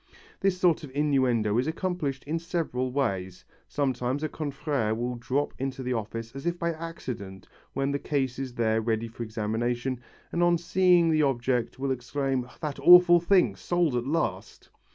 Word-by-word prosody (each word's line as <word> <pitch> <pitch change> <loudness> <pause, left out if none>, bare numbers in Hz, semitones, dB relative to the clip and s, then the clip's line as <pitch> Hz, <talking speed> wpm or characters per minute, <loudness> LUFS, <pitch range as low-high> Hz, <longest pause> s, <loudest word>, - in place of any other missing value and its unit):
This 195 -1 +1
sort 175 -3 +3
of 145 - -7
innuendo 125 -7 +2
is 130 - 0
accomplished 160 -5 -2
in 160 +3 -2
several 160 -7 -2
ways. 95 -9 -2 0.2
Sometimes 130 0 -1
a 155 - -1
confrère 140 -7 -2
will 120 +1 -2
drop 130 +4 -2
into 135 0 -3
the 125 0 -1
office 115 0 -4
as 135 +4 -5
if 175 0 0
by 170 0 -1
accident 125 - -7 0.3
when 135 0 0
the 140 - -1
case 135 -4 -1
is 130 -2 -5
there 110 -1 +1
ready 110 0 -1
for 115 +1 -11
examination, 120 +3 -2 0.3
and 170 - -1
on 175 0 +4
seeing 175 -1 +3
the 155 -1 +3
object 125 -4 0
will 135 0 -1
exclaim, 130 0 -2
"That 150 -3 -4
awful 175 +3 +8
thing, 180 +2 +3
sold 175 -6 0
at 120 +1 -1
last!" 165 +3 -3
135 Hz, 170 wpm, -27 LUFS, 120-160 Hz, 0.3 s, awful